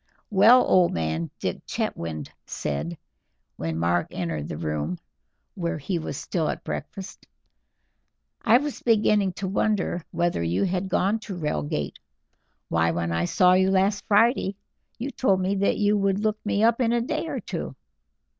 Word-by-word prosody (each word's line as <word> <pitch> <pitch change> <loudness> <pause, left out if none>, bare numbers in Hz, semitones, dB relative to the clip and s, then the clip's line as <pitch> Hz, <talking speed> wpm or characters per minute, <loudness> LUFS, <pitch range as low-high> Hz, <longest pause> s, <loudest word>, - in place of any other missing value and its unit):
"Well, 220 +6 +7
old 180 -2 +4
man," 80 0 -1
Dick - - -3
Chetwynd 80 -3 -3 0.2
said, 75 +4 -3 0.6
when 80 0 -3
Mark 85 +1 +1
entered 80 -5 -3
the - - -5
room, 75 +1 -2 0.6
where 170 -2 -2
he 170 +4 -2
was 155 - -5
still 165 -4 -1
at - - -4
breakfast, 195 0 -7 1.1
"I 235 +1 +6
was 290 +1 -4
beginning 210 -4 +3
to 190 +2 -4
wonder 195 -3 0
whether 170 - 0
you 85 - 0
had 190 0 -1
gone 200 +4 +1
to 210 -3 -7
Reigate. 75 - -2 0.7
Why, 85 0 +2
when 85 0 -1
I 85 +1 0
saw 180 - +4
you 190 +1 +4
last 195 +2 +2
Friday 210 -2 +3 0.4
you 260 +4 -4
told 195 -10 +2
me 190 +1 0
that 200 - +2
you 205 0 +3
would 195 -1 +1
look 215 +1 -1
me 210 0 +1
up 230 +2 +3
in 235 -1 +2
a 240 - +2
day 310 +6 -2
or - - -3
two." - - -5
185 Hz, 160 wpm, -25 LUFS, -, 1.1 s, Well